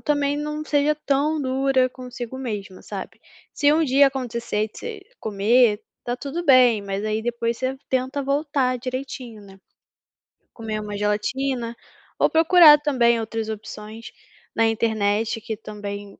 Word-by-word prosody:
também 290 Hz, -1 st, 0 dB
não 300 Hz, +1 st, -4 dB
seja 295 Hz, 0 st, +2 dB
tão 295 Hz, +3 st, +1 dB
dura 260 Hz, 0 st, +2 dB
consigo 250 Hz, -1 st, -8 dB
mesma, 205 Hz, -7 st, -6 dB
sabe? -, -, -8 dB, 0.3 s
Se 290 Hz, 0 st, +3 dB
um 320 Hz, +2 st, +3 dB
dia 280 Hz, 0 st, +5 dB
acontecer 235 Hz, -5 st, -2 dB
de -, -, -14 dB
você 455 Hz, -3 st, -7 dB, 0.2 s
comer, 215 Hz, +1 st, +2 dB, 0.2 s
está 245 Hz, 0 st, -3 dB
tudo 295 Hz, +6 st, -5 dB
bem, 250 Hz, -7 st, +5 dB
mas 200 Hz, +1 st, -4 dB
aí 215 Hz, 0 st, -1 dB
depois 235 Hz, 0 st, -2 dB
você 260 Hz, +1 st, -2 dB
tenta 260 Hz, +2 st, -1 dB
voltar 275 Hz, -2 st, 0 dB
direitinho, 255 Hz, -3 st, -6 dB
né. 195 Hz, -1 st, -15 dB, 1.0 s
Comer 220 Hz, -2 st, -4 dB
uma 205 Hz, -1 st, -5 dB
gelatina, 235 Hz, +4 st, -1 dB, 0.4 s
ou -, -, +4 dB
procurar 325 Hz, -1 st, +7 dB
também 245 Hz, -6 st, +2 dB
outras 225 Hz, 0 st, -4 dB
opções 215 Hz, +1 st, -8 dB, 0.4 s
na 225 Hz, 0 st, +3 dB
internet 220 Hz, 0 st, 0 dB
que 220 Hz, 0 st, -5 dB
também, 205 Hz, -1 st, -8 dB
245 Hz, 140 wpm, -23 LUFS, 215-275 Hz, 1.0 s, procurar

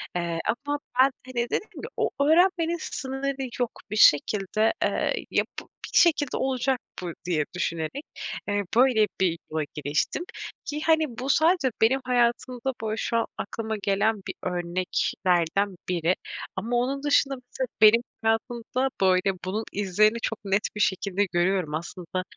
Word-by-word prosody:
Eee, 170 Hz, -1 st, -1 dB, 0.3 s
ama 290 Hz, 0 st, -1 dB, 0.2 s
ben, 265 Hz, +1 st, +7 dB
hani, 240 Hz, -2 st, -2 dB
dedim 430 Hz, -, -1 dB
ki, -, -, -5 dB
o -, -, +1 dB
öğrenmenin 340 Hz, +2 st, +4 dB
sınırı 270 Hz, 0 st, -3 dB, 0.2 s
yok. 245 Hz, -2 st, 0 dB, 0.2 s
Bir -, -, -2 dB
şekilde, 210 Hz, +4 st, +4 dB
eee, -, -, +1 dB, 0.2 s
yapıp -, -, -2 dB, 0.2 s
bir -, -, +4 dB
şekilde 315 Hz, -5 st, +4 dB
olacak 260 Hz, 0 st, 0 dB, 0.2 s
bu 175 Hz, -2 st, -4 dB
diye 160 Hz, -4 st, +1 dB
düşünerek, 170 Hz, -, -2 dB, 0.4 s
eee, 205 Hz, 0 st, 0 dB
böyle, 240 Hz, -3 st, +5 dB
bir 170 Hz, -3 st, +2 dB
yola 155 Hz, 0 st, 0 dB
giriştim. 150 Hz, -, -1 dB, 0.4 s
Ki, 300 Hz, +1 st, -4 dB
hani, 320 Hz, -1 st, +4 dB
bu 265 Hz, +2 st, -3 dB
sadece 315 Hz, -3 st, +3 dB
benim 260 Hz, +5 st, +4 dB
hayatımda, 250 Hz, +1 st, +1 dB
böyle, 215 Hz, 0 st, -2 dB
şu 230 Hz, -, 0 dB
an 230 Hz, -, +1 dB
aklıma 220 Hz, +2 st, -4 dB
gelen 205 Hz, +3 st, +2 dB
bir -, -, -3 dB
örneklerden 180 Hz, +1 st, 0 dB
biri 175 Hz, 0 st, +1 dB, 0.4 s
ama 240 Hz, +2 st, -2 dB
onun 265 Hz, +3 st, 0 dB
dışında 285 Hz, -1 st, +3 dB
mesela 255 Hz, 0 st, -5 dB
benim 220 Hz, +2 st, +8 dB, 0.2 s
hayatımda, 235 Hz, +3 st, 0 dB
böyle, 190 Hz, +1 st, +3 dB
bunun 205 Hz, +4 st, -2 dB
izlerini 205 Hz, +3 st, +2 dB
çok 225 Hz, -, -2 dB
net 195 Hz, +1 st, +2 dB
bir 210 Hz, -, -2 dB
şekilde 200 Hz, +1 st, +1 dB
görüyorum. 175 Hz, -3 st, 0 dB
Aslında 180 Hz, +2 st, -4 dB
220 Hz, 145 wpm, -26 LUFS, 185-265 Hz, 0.4 s, benim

